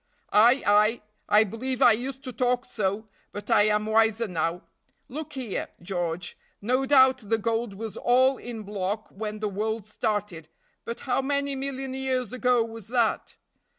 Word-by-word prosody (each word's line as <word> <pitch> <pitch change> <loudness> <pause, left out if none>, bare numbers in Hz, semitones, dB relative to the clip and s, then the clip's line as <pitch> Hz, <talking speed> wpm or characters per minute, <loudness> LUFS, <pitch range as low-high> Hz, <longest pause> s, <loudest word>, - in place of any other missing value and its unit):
"Ay! 240 +6 +5
ay! 210 +3 +4 0.3
I 210 +1 +6
believe 240 +5 -4
I 250 -3 +7
used 260 +4 -3
to 255 -2 -6
talk 250 0 0
so; 210 -2 -2 0.2
but 205 - -7
I 205 - +5
am 210 0 +1
wiser 220 +1 +2
now. 170 -1 -2 0.4
Look 300 +3 -7
here, 250 -7 -4
George, 175 -1 -3 0.2
no 255 +5 0
doubt 260 -1 +6
the 225 - +3
gold 225 -1 -2
was 220 +1 -6
all 260 +2 +3
in 230 -3 -7
block 205 +1 -3
when 215 +1 -6
the 215 - 0
world 215 +1 -3
started, 210 -7 -3 0.4
but 235 - -5
how 260 0 0
many 280 0 -1
million 270 -1 -4
years 260 -3 -2
ago 250 -2 +2
was 225 -2 -9
that? 235 -2 0
225 Hz, 160 wpm, -26 LUFS, 210-255 Hz, 0.4 s, I